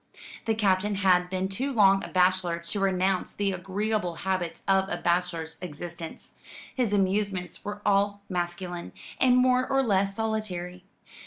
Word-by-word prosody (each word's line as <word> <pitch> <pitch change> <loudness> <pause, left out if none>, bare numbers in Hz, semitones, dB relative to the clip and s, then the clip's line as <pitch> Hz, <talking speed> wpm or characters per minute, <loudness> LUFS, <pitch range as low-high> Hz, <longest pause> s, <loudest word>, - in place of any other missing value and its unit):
The 225 -1 +1
Captain 205 -1 +2
had 180 -2 +3
been 185 0 -1
too 255 +9 -2
long 195 -5 +5
a - - -5
bachelor 180 -2 +2
to 170 +4 -3
renounce 190 -1 +1
the 200 -1 0
agreeable 190 0 -2
habits 185 -1 -3
of 195 0 +3
a - - -2
bachelor's 170 -2 -1
existence. 170 0 -8 0.4
His 245 -5 0
amusements 195 -3 0
were 205 0 -6
all 200 0 +2
masculine, 175 -1 -4 0.3
and 250 -1 +5
more 255 0 +3
or 270 0 +2
less 195 -3 +1
solitary. 190 -5 -3
190 Hz, 145 wpm, -27 LUFS, 180-205 Hz, 0.4 s, long